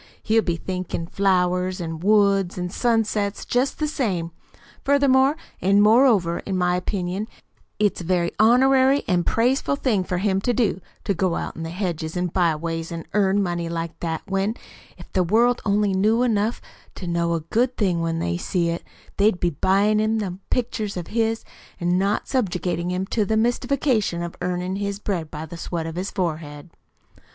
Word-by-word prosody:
He'll 225 0 +3
be 175 -5 -1
THINKIN' 180 -1 -4
flowers 185 -1 +1
an' 165 -2 -4
woods 200 -1 +3
an' 180 0 -3
sunsets 215 -3 0
jest 250 +3 0
the 305 - 0
same. 190 - -2 0.5
Furthermore 275 0 +4 0.3
an' 200 +2 +4
moreover, 210 -5 +4
in 190 -2 -3
my 180 0 +2
opinion 185 +2 -2 0.5
it's 205 -3 +1
a - - -6
very 175 0 +1
honorary 265 +4 +5
an' 180 -3 +2
praiseful 255 +5 +1
thing 245 -9 0
for 180 0 -2
him 190 0 +1
to 245 - +1
do, 215 -5 0 0.2
to 200 - 0
go 180 -1 0
out - - -4
in - - -7
the 165 - -4
hedges 170 -2 -3
an' 180 -1 -1
byways 165 -1 0
an' 165 -1 -5
earn 200 0 +3
money 175 -2 -2
like 165 0 -4
that, 160 -2 -3
when, 195 +3 -1 0.4
if - - -14
the 185 - +3
world 230 +7 +3
only 205 -1 +2
knew 215 +5 +3
enough 225 -1 0 0.3
to 185 - -7
know 170 -1 0
a 165 - -2
good 240 +10 0
thing 180 -5 +1
when 165 0 -1
they 85 - -1
see 170 - -1
it, 170 - -3 0.3
they'd 200 -2 +3
be 175 - +1
buy 190 +6 +2
in' 215 +1 +2
them 190 -4 -3
pictures 220 -5 -2
of 175 - -5
his, 225 0 0 0.3
an' 175 +1 +1
not 200 +2 0
subjugate 180 -9 -1
him 180 +2 -2
to 215 +2 0
the 220 +2 0
mystification 240 -5 +1
of 170 - -6
earnin' 180 +1 -2
his 200 0 -2
bread 185 -6 -3
by 155 +1 -6
the 165 +2 -9
sweat 165 -1 -4
of 165 - -5
his 185 +4 -3
forehead." 155 -3 -4
190 Hz, 180 wpm, -23 LUFS, 175-220 Hz, 0.5 s, honorary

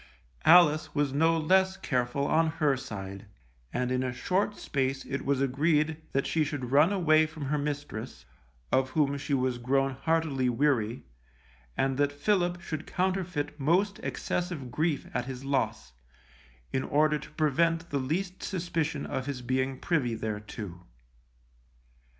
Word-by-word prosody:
Alice 160 -3 +6
was 145 -2 +1
no 165 +3 +3
less 190 +4 +3
careful 130 -1 -1
on 160 +3 +3
her 150 -4 +2
side, 100 -6 -7 0.4
and 125 0 -1
in 130 0 +1
a 130 -1 -1
short 190 +11 -1
space 135 -1 -2
it 140 - -3
was 140 -1 +1
agreed 150 +3 +2
that 135 - 0
she 160 - +1
should 140 -4 -4
run 150 +7 +5
away 155 -5 +4
from 155 -2 -7
her 150 +2 0
mistress, 145 -6 -5 0.5
of 130 0 +2
whom 140 0 +1
she 140 0 -1
was 130 -2 0
grown 135 +2 +1
heartily 140 -2 0
weary, 120 -3 +1 0.7
and 135 -1 +1
that 145 0 +2
Philip 175 +3 +1
should 155 -2 -5
counterfeit 180 -5 -1
most 185 +8 +2
excessive 175 -8 -3
grief 155 +2 0
at 125 -1 -1
his 130 0 -7
loss, 135 - -1 0.8
in 130 - +1
order 150 +2 +2
to 150 - -11
prevent 165 +3 +1
the 140 - 0
least 180 +8 -2
suspicion 165 -5 -2
of 130 +1 -3
his 130 -3 -4
being 130 +1 0
privy 130 -9 0
thereto. 105 -4 -5
145 Hz, 145 wpm, -29 LUFS, 130-165 Hz, 0.8 s, Alice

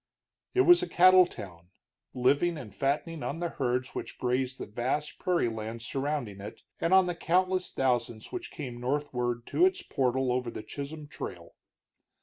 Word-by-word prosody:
It 380 - +6
was 355 -1 +7
a 365 - -3
cattle 185 0 +7
town, 85 - -10 0.5
living 140 +7 +2
and 110 -8 -9
fattening 145 - -1
on 160 - -3
the 175 0 -1
herds 125 -3 -1
which - - -6
grazed 125 +1 -1
the - - -5
vast 130 +7 -2
prairie 180 -8 +1
lands 115 +1 -5
surrounding 135 -8 -3
it, 100 - -9 0.2
and 165 - 0
on 190 0 +7
the 175 - -1
countless 185 +2 +1
thousands 120 -4 -1
which 360 -1 -5
came 125 -5 -7
northward 125 -3 -1
to 350 - +1
its 375 +1 +3
portal 130 0 0
over 125 -1 -1
the 110 - -7
Chisholm 145 +6 -7
Trail. - - -8
135 Hz, 165 wpm, -29 LUFS, 120-170 Hz, 0.5 s, was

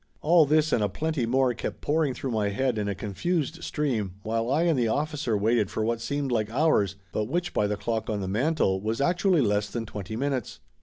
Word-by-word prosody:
All 160 -1 +5
this 155 +1 +3
and 110 - +2
a 105 - +1
plenty 150 0 -1
more 130 +1 +2
kept 115 - -5
pouring 150 -3 +1
through 130 +1 -4
my 105 -3 0
head 120 +2 0
in 105 - -1
a 100 - -1
confused 155 - -2
stream 115 - -1
while 115 +2 -1
I 150 +5 +2
and 165 -6 +2
the 120 - +2
officer 145 -2 -1
waited 110 -1 +2
for 110 - -2
what 115 0 -1
seemed 140 +1 -2
like 110 -3 0
hours, 115 - +2 0.2
but 105 - -1
which, 175 +9 -2
by 105 - +2
the 105 0 -2
clock 115 +1 -2
on 105 -2 -1
the 95 - -3
mantel, 105 -3 +1
was 110 +2 -2
actually 175 +2 +3
less 105 -3 +1
than 115 +1 -4
twenty 105 0 -6
minutes. 135 -1 -2
120 Hz, 220 wpm, -27 LUFS, 105-150 Hz, 0.2 s, All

